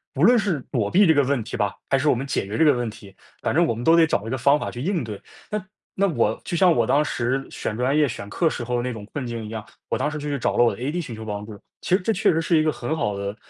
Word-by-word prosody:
无 - - 0
论 245 - +6
是 195 -8 0
躲 110 -6 0
避 195 0 +5
这 160 - +6
个 145 - +3
问 135 -2 0
题 115 - -6
吧， 105 -2 -1
还 135 - +3
是 145 +3 +1
我 - - +5
们 135 +3 -4
解 135 - -1
决 105 - -4
这 160 - +4
个 150 - +6
问 120 -2 -2
题， 105 -3 -13 0.3
反 - - -1
正 175 - +5
我 160 - 0
们 115 +2 -6
都 165 - +6
得 165 -1 +6
找 105 -7 -1
一 - - -4
个 130 - -1
方 140 +4 +4
法 - - -3
去 120 - -7
应 175 +3 0
对。 105 -3 -7 0.3
那 210 -3 -3 0.3
那 200 +1 +2
我 115 - 0
就 175 - -3
像 180 0 +5
我 115 -5 +1
当 145 +2 +3
时 130 -1 -1
选 105 - -4
专 130 +4 +1
业 150 - +4
选 100 -5 -6
课 165 - +1
时 - - -4
候 125 +1 -1
的 - - 0
那 125 +1 -2
种 105 -2 -8
困 140 -3 -3
境 115 -1 -5
一 105 - -7
样， 110 -2 -6 0.2
我 - - 0
当 150 - 0
时 155 - -5
就 150 0 -4
去 140 - -1
找 - - 0
了 120 - +6
我 120 - +3
的 - - -12
ad 150 +7 -1
寻 125 - -7
求 110 0 -8
帮 105 -1 -4
助， 105 -2 -10 0.2
其 - - -2
实 - - +1
这 220 +4 +1
确 200 - +3
实 165 - +1
是 165 +1 +2
一 155 - +3
个 155 - +2
很 120 +3 -3
好 105 -10 -1
的 100 +1 -4
130 Hz, 365 characters per minute, -23 LUFS, 115-160 Hz, 0.3 s, 论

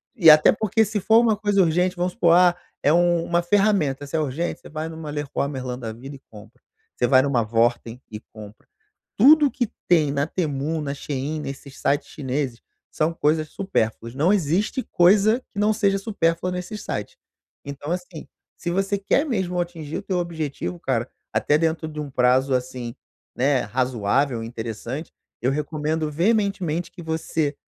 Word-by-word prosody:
E 175 -9 +7
até 155 0 +8
porque 220 +1 +1
se 210 0 -2
for 220 +4 +5
uma 230 -2 +3
coisa 205 -1 +2
urgente, 180 +2 +1
vamos 180 +1 -1
supor, 170 -1 +3
"Ah, 180 0 +5 0.3
é 145 - +3
uma 175 0 +2
ferramenta." 175 -7 +1
Se 140 - -5
é - - +2
urgente, 155 +4 -2
você - - -13
vai 155 +1 -4
numa 160 -1 -7
Leroy 145 -1 -2
Merlin 130 -3 -5
da 115 -3 -5
vida 130 +6 -9
e - - -13
compra. 110 +1 -15 0.3
Você 120 - +1
vai 130 0 +5
em - - 0
uma 135 -4 +1
Wortem 115 +2 0
e 105 - -6
compra. 105 -1 -12 0.5
Tudo 290 +4 +6
que 240 -5 -2 0.2
tem 155 -5 +4
na 140 0 0
Temu, 155 -2 -2
na 140 -1 -3
Shein, 145 +2 -4
nesse 140 0 -7
site 140 +2 0
chineses, 130 -3 -3 0.3
são 160 +2 0
coisas 155 -1 0
supérfluas 115 - -2
não 155 +7 +3
existe 200 - 0
coisa 205 +6 +4
que 200 - -5
não 210 +1 +3
seja 200 -2 +2
supérfluas 180 -4 -1
nesse 180 +4 -5
sites, 105 - -5 0.5
então, 140 +2 -6
assim, 180 -4 -5 0.3
se 175 - -4
você 195 +3 0
quer 275 +9 +1
mesmo 190 - -1
atingir 165 -3 -4
o - - -5
teu 185 - -2
objetivo, 170 0 -4
cara, 130 -5 -1 0.2
até 150 - +2
dentro 160 0 -1
de 155 -1 -7
um 150 - -4
prazo, 130 +2 +3
assim, 125 -2 -4 0.4
né, 130 0 +2
razoável, 125 0 0
interessante, 115 +5 -6 0.3
eu 125 - +1
recomendo 150 +2 -2
veementemente 180 -2 0
que 180 - -11
você 160 -2 -2
155 Hz, 175 wpm, -23 LUFS, 135-180 Hz, 0.5 s, até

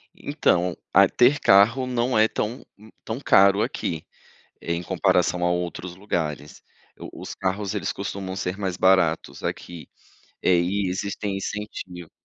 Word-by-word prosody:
Então, 90 0 0 0.2
a - - +7
ter 130 +5 +4
carro 115 +7 +4
não 125 -1 0
é 110 - +5
tão 110 +2 -4 0.4
tão 115 +4 -4
caro 100 -4 +5
aqui, 80 -2 -4 0.6
em 85 +1 -3
comparação 90 +1 +1
a - - +2
outros 90 0 -4
lugares, 75 - -4 0.4
o - - -10
os - - -6
carros, 95 +1 -2
eles - - -2
costumam 95 -1 -5
ser 90 0 -3
mais 95 -3 -2
baratos 95 -4 +2
aqui, 85 -5 -6 0.5
eh, 90 - +4
e 95 +2 -1
existem 100 +1 -3
incentivos. 95 -4 -6
95 Hz, 135 wpm, -24 LUFS, 90-105 Hz, 0.6 s, a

